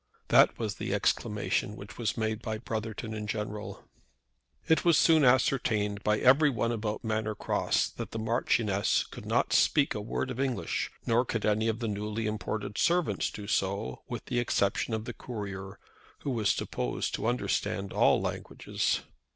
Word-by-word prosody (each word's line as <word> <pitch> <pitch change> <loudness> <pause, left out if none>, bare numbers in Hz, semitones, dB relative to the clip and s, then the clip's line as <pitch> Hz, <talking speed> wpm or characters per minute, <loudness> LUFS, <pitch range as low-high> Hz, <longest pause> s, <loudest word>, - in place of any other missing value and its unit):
That - - +6
was 105 -6 -3
the - - -2
exclamation 105 0 0
which 100 0 -11
was 115 0 -1
made 110 -1 -1
by 110 -2 -3
Brotherton 110 0 -4
in 105 -1 -5
general. 105 -1 -5 0.8
It 160 -1 +3
was 170 -4 +5
soon 160 -2 +5
ascertained 115 -5 +2
by 105 0 +2
every 140 +6 +5
one 115 -2 0
about 110 -2 -3
Manor 110 -1 -1
Cross - - 0
that - - -4
the - - -6
Marchioness 110 -2 +1
could - - -10
not - - +1
speak 145 -2 +4
a 105 - -4
word 125 +4 -3
of 125 - -6
English, 135 -3 -1 0.2
nor 115 +2 +3
could 115 -3 -2
any 105 +1 +2
of 110 -1 0
the 115 0 -3
newly 105 +1 -3
imported 105 -1 -3
servants 175 0 +2
do 105 - -8
so 100 +1 -1
with 120 - -6
the 120 -2 -1
exception 110 -1 +1
of 110 0 -4
the - - -5
courier, 100 -4 -6 0.4
who 140 - -2
was 110 -5 +1
supposed 60 -1 -2
to - - -1
understand 100 -4 -1
all - - +4
languages. - - -2
110 Hz, 165 wpm, -29 LUFS, 105-120 Hz, 0.8 s, That